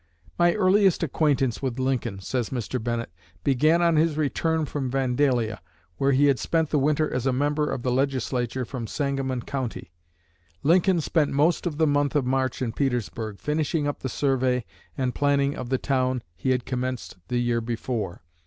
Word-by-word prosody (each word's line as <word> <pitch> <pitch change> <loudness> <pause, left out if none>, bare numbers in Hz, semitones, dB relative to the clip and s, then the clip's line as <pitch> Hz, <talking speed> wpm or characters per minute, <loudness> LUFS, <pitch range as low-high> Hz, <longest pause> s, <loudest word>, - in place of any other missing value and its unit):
"My 175 0 +4
earliest 195 -2 +3
acquaintance 140 -5 +1
with 130 -3 -2
Lincoln," 125 -6 -1
says 120 +3 -2
Mr. 125 -1 -3
Bennett, 120 -5 -2 0.3
"began 155 +6 +3
on 170 -2 +3
his 155 -1 +2
return 160 +1 0
from 140 -3 -3
Vandalia, 125 -4 +1 0.4
where 135 0 +2
he 140 +2 +4
had 140 -3 +3
spent 160 -2 0
the 150 - +3
winter 150 +2 +1
as 125 +1 -1
a - - +3
member 145 +3 0
of 120 - -3
the 125 - 0
Legislature 130 -1 -1
from 120 -2 -5
Sangamon 135 -3 -2
County. 130 -10 -4 0.7
Lincoln 175 +2 +4
spent 150 -1 +1
most 155 +5 +2
of 150 -4 -4
the 160 - +3
month 145 -1 +1
of 145 -4 +2
March 130 0 0
in 115 - -1
Petersburg, 115 -6 -2
finishing 150 0 0
up 145 - -3
the 130 - -4
survey 130 -3 +1 0.3
and 130 -2 0
planning 140 0 +1
of 120 - -6
the 130 - +2
town 130 -2 0
he 130 - -2
had 125 -2 +1
commenced 125 -4 -3
the 125 - -1
year 120 -1 +1
before. 115 -6 -3
135 Hz, 175 wpm, -25 LUFS, 125-150 Hz, 0.7 s, My